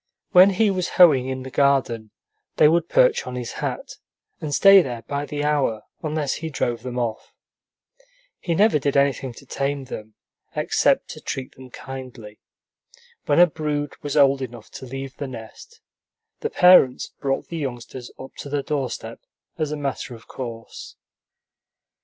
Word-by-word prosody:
When 185 +1 +8
he 200 +2 +2
was 185 -2 -2
hoeing 150 -8 +6
in 130 -1 -4
the 130 - -8
garden, 130 -6 +1 0.5
they 150 - +6
would 165 +1 +2
perch - - +3
on 125 - -5
his 125 -2 -5
hat, - - -5 0.4
and 155 - -5
stay 195 +6 +7
there 120 -6 -5
by 145 0 -4
the 145 0 -3
hour, 140 -8 0 0.2
unless 155 -3 -1
he 160 - -5
drove 120 -5 -2
them 125 -1 -6
off. 115 -3 -4 1.0
He 170 - -2
never 205 -4 +4
did 140 0 0
anything 140 -2 +1
to 140 - -14
tame 140 +1 -2
them 110 -4 -9 0.4
except - - +1
to - - -9
treat 130 -1 -5
them 130 -1 -13
kindly. 125 -5 -9 0.9
When 145 +2 +3
a 175 - +9
brood 150 -3 -3
was 145 0 -3
old 140 -1 +5
enough 120 -4 -8
to 130 - -9
leave 135 +1 -7
the 140 - -4
nest, 130 - -11 0.6
the 450 - -2
parents 180 - +5
brought 135 -1 -2
the 170 - -5
youngsters 125 -3 -6
up 130 - -10
to 140 - -7
the 145 -1 -1
doorstep 130 -6 -4 0.4
as 155 -2 -1
a 150 - -3
matter 140 -3 -4
of 115 - -16
course. 115 -3 -8
140 Hz, 165 wpm, -23 LUFS, 125-155 Hz, 1.0 s, a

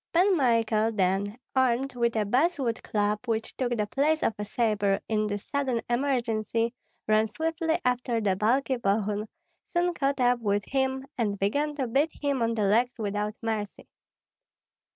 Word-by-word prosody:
Pan 370 +3 +4
Michael, 230 -5 +2
then, 200 +2 0 0.2
armed 260 +1 +2
with 235 -1 0
a 215 -1 +1
basswood 260 - +1
club, 210 0 0
which 225 -1 -2
took 245 -2 -1
the 210 - +1
place 295 +8 +1
of - - +2
a - - -1
sabre 205 -2 +1
in 215 -1 0
this 205 -1 -4
sudden 270 -4 -1
emergency, 235 -3 0 0.3
ran 215 +1 +3
swiftly 325 - -1
after 250 -1 +1
the 200 -4 +1
bulky 255 +6 +1
Bogun, 210 0 0 0.5
soon 350 0 +2
caught 275 -3 -1
up 245 -1 +3
with 205 -2 0
him, 265 0 -1
and 205 -3 0
began 285 +10 0
to 275 -3 -1
beat 275 +7 +2
him 280 -3 0
on 230 0 +1
the 215 - 0
legs 235 +5 +2
without 210 -1 -2
mercy. 215 -3 -3
230 Hz, 160 wpm, -27 LUFS, 210-270 Hz, 0.5 s, Pan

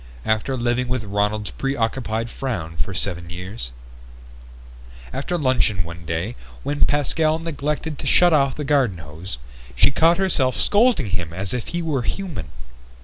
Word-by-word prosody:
After 110 +5 +1
living 120 +1 +1
with 125 -2 -1
Ronald's 105 +1 0
preoccupied 115 -3 -1
frown 95 - -3
for 95 - -2
seven 90 -3 -3
years... 90 - -6 1.4
After 175 +5 -1
luncheon 130 - +2
one 85 0 -9
day, 85 +9 -2 0.3
when 145 +1 +2
Pascal 155 +2 +2
neglected 150 -1 -3
to - - -4
shut 175 -1 +6
off 140 -3 +3
the 150 - -3
garden 135 -9 +2
hose, 75 0 -6 0.4
she 65 - +5
caught 165 +6 +4
herself 140 - +2
scolding 205 - +3
him 85 -3 -2
as 95 +3 -3
if 125 -2 -3
he 175 0 -2
were 150 -5 0
human. 150 - -3
125 Hz, 145 wpm, -23 LUFS, 95-145 Hz, 1.4 s, shut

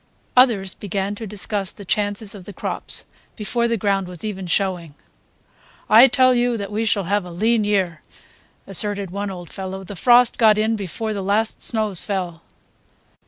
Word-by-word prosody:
Others 225 -7 +4
began 200 0 -3
to 220 +1 -7
discuss 200 -1 -2
the 200 - -11
chances 205 +1 -1
of 195 -4 -11
the 205 - -8
crops, - - -4 0.3
before 235 +2 0
the 230 0 0
ground 195 -2 0
was 180 +1 -6
even 190 -3 -4
showing. 175 -4 -1 1.0
"I 230 +5 +9
tell 255 0 +4
you 240 -1 +1
that 200 -1 -5
we 220 +2 -1
shall 200 -2 +1
have 200 +3 0
a 180 - -9
lean 215 +6 +1
year," 190 -6 0 0.6
asserted 200 -1 0
one 200 +1 -3
old 175 -3 -8
fellow, 190 0 -6
"the 200 +2 -8
frost 245 +4 +4
got 215 -2 +5
in 220 +1 +1
before 215 +2 -4
the 200 - -3
last 205 +3 0
snows 215 -5 0
fell." 180 -5 -4
205 Hz, 170 wpm, -21 LUFS, 190-220 Hz, 1.0 s, I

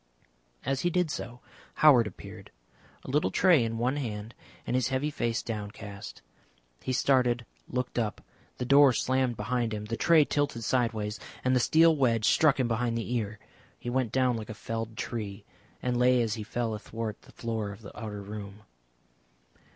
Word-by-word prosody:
As 135 +1 0
he 175 - +2
did 175 -2 +1
so 120 -2 -6 0.3
Howard 130 -7 +6
appeared, 100 - -10 0.6
a - - -5
little 150 +2 +2
tray 175 -9 +4
in 115 0 -2
one 125 +5 0
hand 110 -4 -4 0.3
and - - -1
his 130 -1 +2
heavy 130 +3 -1
face 120 -4 -1
downcast. 105 -2 -7 0.6
He - - -3
started, 125 -2 +2 0.2
looked 125 -1 -2
up, 110 -3 -2 0.4
the 125 - -3
door 140 +1 +7
slammed 130 -1 +1
behind 115 +1 -1
him, 105 0 -5
the 115 +2 -3
tray 165 -3 +5
tilted 145 -6 -1
side 120 0 +1
ways, 105 0 -4 0.3
and 130 0 +3
the - - +4
steel 160 +6 +5
wedge 115 -6 +2
struck 145 +3 +4
him 130 - +2
behind 115 0 0
the 115 +1 -3
ear. 110 -3 -2 0.4
He 120 - -5
went 130 -3 0
down 125 -1 +2
like 110 - -7
a 110 - -6
felled 115 0 -5
tree, 105 -4 -5 0.4
and 125 -1 0
lay 125 0 +4
as 110 -2 -1
he 110 - -4
fell 115 +1 -2
athwart 110 0 -5
the - - -18
floor 110 -3 -3
of 100 +3 -12
the 100 - -11
outer 105 -2 -6
room. 105 0 -8
120 Hz, 180 wpm, -29 LUFS, 110-130 Hz, 0.6 s, door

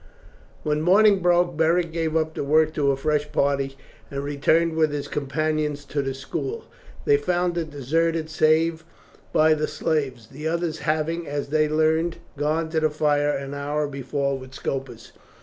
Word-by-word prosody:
When 150 0 0
morning 200 +4 +5
broke, 175 -1 +2
Beric 165 +2 +2
gave 165 -1 -2
up 160 0 +1
the - - -3
work 155 +2 +3
to 145 -3 +1
a 135 - +1
fresh 150 +1 0
party 140 -1 0 0.3
and 140 0 -4
returned 160 +3 +2
with 155 -2 +2
his 145 -1 -3
companions 150 0 -2
to 140 +1 -2
the 135 -1 -3
school. 400 - -4 0.4
They 430 -1 +5
found 175 - 0
it 165 -2 -2
deserted, 160 +3 0
save 160 +1 +2 0.5
by 155 0 +5
the 155 0 -1
slaves, 140 -8 -2
the 150 +3 -5
others 165 -1 -1
having, 160 +2 -1
as 145 -1 -3
they 155 0 +2
learned, 160 +2 +1 0.2
gone 155 +3 0
to 160 0 0
the 155 0 +2
fire 145 -1 +1
an 140 -1 -3
hour 145 +1 -2
before 140 0 -2
with 130 0 -12
Scopus. 130 -5 -5
155 Hz, 165 wpm, -24 LUFS, 140-165 Hz, 0.5 s, morning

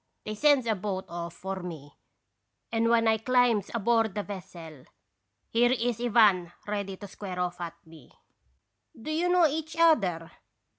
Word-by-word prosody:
They 215 - -4
sends 280 +2 +3
a 225 - +2
boat 190 -1 -4
off 170 0 -6
for 190 0 -5
me, 155 -5 -8 0.8
and 230 0 +1
when 230 -1 +3
I 220 0 +3
climbs 245 -3 +2
aboard 225 -2 +1
the 205 - -2
vessel, 165 -8 -10 0.7
here 240 +2 +3
is 240 -2 -1
Ivan 210 -7 +4
ready 200 -2 -4
to 205 - -9
square 190 -2 -7
off 180 0 -3
at 170 -1 -5
me. 160 -1 -16 0.4
" 290 - -27
'Do 265 +7 -6
you 335 +3 0
know 355 -1 +5
each 315 +1 -2
other?' 190 - +3
210 Hz, 160 wpm, -28 LUFS, 180-240 Hz, 0.8 s, know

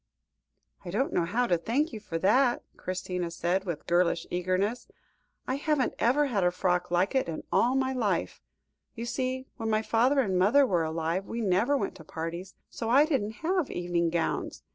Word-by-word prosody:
"I 180 - -7
don't 250 +10 -1
know 170 - +2
how 230 +8 +1
to 175 -7 +1
thank 255 - 0
you 220 - -5
for 190 -6 -4
that," 240 +8 +3
Christina 180 -1 -3
said, 175 +3 -1
with 170 -5 -4
girlish 175 -1 +2
eagerness. 185 +6 -1 0.6
"I 260 - 0
haven't 290 -3 0
ever 275 +5 +3
had 215 -9 0
a 180 - +4
frock 180 0 0
like 175 +2 +1
it 265 -9 +1
in 160 - -5
all 250 +3 +3
my 265 0 +1
life. 205 - -1 0.5
You 230 - -5
see, 260 +1 -2
when 225 -2 -3
my 215 0 +1
father 250 +6 +3
and 190 -6 0
mother 245 +10 +5
were 175 -9 +1
alive, 165 +4 -2
we 230 - -4
never 215 +8 +2
went - - -2
to 160 - -12
parties, 165 +4 -6
so 230 - -5
I 275 +5 +6
didn't 250 -3 -2
have 360 -4 +1
evening 175 -1 0
gowns. 165 -1 -2
200 Hz, 185 wpm, -28 LUFS, 175-255 Hz, 0.6 s, I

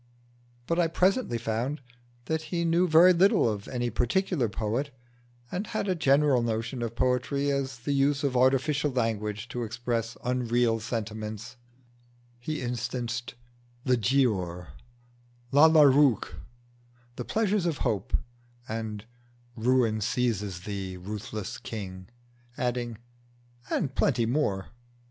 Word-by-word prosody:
But 170 +5 0
I 170 - +4
presently 185 - +1
found 115 +6 -2 0.5
that 160 +2 -1
he 170 -1 -1
knew 170 +2 +3
very 170 +3 +7
little 185 -6 +4
of 105 -2 -3
any 120 -2 -2
particular 125 - +1
poet, 115 +7 -2 0.6
and 190 +4 -3
had 215 - -2
a 185 - +2
general 140 -5 +3
notion 115 +2 -2
of 115 -1 -3
poetry 130 +3 +1
as 135 -2 -2
the 120 +5 -4
use 140 +1 +2
of 135 -3 0
artificial 135 +4 +3
language 110 -4 -2
to 120 +1 -4
express 115 0 -3
unreal 120 -2 +1
sentiments: 110 -1 -5 0.8
he 155 +4 -4
instanced 120 -1 -3 0.5
"The 130 -2 +3
Giaour," 100 - 0 0.8
"Lalla 155 +1 +7
Rookh," 135 -5 +3 0.8
"The - - -4
Pleasures 210 -4 +1
of 160 -4 -1
Hope," 110 -1 0 0.5
and 110 -1 -4 0.5
"Ruin 115 -2 +2
seize 105 -5 -1
thee, 95 -2 -5
ruthless 105 +3 -6
King;" 95 -6 -7 0.5
adding, 120 -2 -2 0.7
"and 140 -7 -1
plenty 120 -5 +2
more." 110 -7 0
120 Hz, 120 wpm, -28 LUFS, 110-145 Hz, 0.8 s, very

